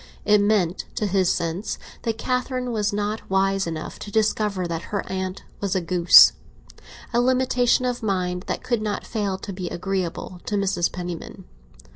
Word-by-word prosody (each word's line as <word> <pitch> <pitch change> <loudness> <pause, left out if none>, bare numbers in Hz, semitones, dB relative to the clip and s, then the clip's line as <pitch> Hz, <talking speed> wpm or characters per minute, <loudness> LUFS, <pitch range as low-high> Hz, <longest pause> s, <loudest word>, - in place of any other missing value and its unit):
It 210 -1 +5
meant, 200 -4 +1
to 215 - -1
his 190 -2 +2
sense, 170 +5 -2 0.2
that 225 -2 -2
Catherine 250 0 -1
was 210 -3 0
not 205 +1 -3
wise 195 0 +1
enough 160 -1 -5
to - - -7
discover 210 -3 +1
that 170 -1 -3
her 200 -2 -3
aunt 185 0 -3 0.2
was 200 -1 -1
a - - +3
goose—a 175 0 +7 0.9
limitation 255 0 +2
of 245 0 -1
mind 185 -3 -1
that - - -3
could 240 -3 0
not 210 -1 -3
fail 205 -4 -2
to 195 +1 -7
be 180 -1 -4
agreeable 180 -1 -3
to 210 - -1
Mrs. 190 -3 +1
Penniman. 175 -2 -6
195 Hz, 160 wpm, -23 LUFS, 180-215 Hz, 0.9 s, goose—a